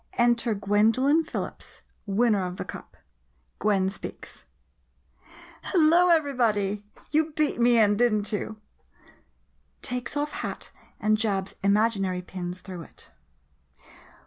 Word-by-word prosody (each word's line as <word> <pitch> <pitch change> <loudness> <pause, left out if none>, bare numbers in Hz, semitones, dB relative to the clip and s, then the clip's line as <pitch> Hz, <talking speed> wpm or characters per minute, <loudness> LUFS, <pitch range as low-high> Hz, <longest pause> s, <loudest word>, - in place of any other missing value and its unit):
Enter 235 -1 +2
Gwendolin 225 +10 +3
Phillips, 310 - -7 0.2
winner 205 0 +2
of 180 0 -5
the - - -4
cup. - - -10 0.6
Gwen 195 -3 +2
speaks - - -10 1.2
Hello, 345 0 +4
everybody! 230 - +1 0.3
You 310 +1 +3
all 315 - -13
beat 305 -6 0
me 240 0 +5
in, 205 -2 +4
did 240 +1 +4
n't 210 0 -1
you? 215 +1 -3 1.2
[Takes 250 +3 -3
off 295 +1 -1
hat - - -6 0.3
and 215 -1 +2
jabs 200 -3 -1
imaginary 200 -3 +1
pins 180 0 -6
through 185 -3 -8
it. - - -14
215 Hz, 120 wpm, -26 LUFS, 200-250 Hz, 1.2 s, me